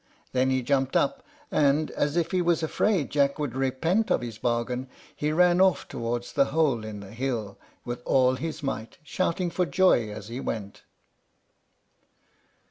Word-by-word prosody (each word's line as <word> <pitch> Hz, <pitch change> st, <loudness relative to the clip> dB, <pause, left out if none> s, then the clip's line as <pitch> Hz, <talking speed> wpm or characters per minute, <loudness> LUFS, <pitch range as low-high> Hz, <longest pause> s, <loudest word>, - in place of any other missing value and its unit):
Then 130 Hz, 0 st, +2 dB
he 130 Hz, -1 st, +1 dB
jumped 135 Hz, 0 st, 0 dB
up; 275 Hz, -1 st, +1 dB, 0.3 s
and, 150 Hz, +1 st, +2 dB
as 145 Hz, +3 st, -1 dB
if 170 Hz, -1 st, 0 dB
he 185 Hz, -1 st, +2 dB
was 170 Hz, -1 st, +1 dB
afraid 170 Hz, 0 st, +1 dB
Jack 140 Hz, -1 st, +2 dB
should 145 Hz, -5 st, -3 dB
repent 135 Hz, -, +1 dB
of -, -, +2 dB
his 115 Hz, -3 st, -7 dB
bargain, 120 Hz, +2 st, -1 dB, 0.3 s
he 150 Hz, +1 st, -1 dB
ran 175 Hz, +2 st, +4 dB
off 190 Hz, -2 st, +3 dB
towards 120 Hz, +1 st, -4 dB
the 140 Hz, -, +4 dB
hole 140 Hz, -5 st, +1 dB
in 105 Hz, -2 st, -7 dB
the 100 Hz, 0 st, -11 dB
hill 115 Hz, -4 st, -3 dB, 0.3 s
with 120 Hz, 0 st, -4 dB
all 130 Hz, 0 st, +3 dB
his 155 Hz, +3 st, -5 dB
might, 115 Hz, -5 st, -4 dB
shouting 175 Hz, +2 st, -1 dB
for 180 Hz, 0 st, 0 dB
joy 165 Hz, -, +3 dB
as 105 Hz, -1 st, -8 dB
he 120 Hz, +2 st, -5 dB
went. 100 Hz, -6 st, -5 dB
135 Hz, 165 wpm, -26 LUFS, 120-165 Hz, 0.3 s, ran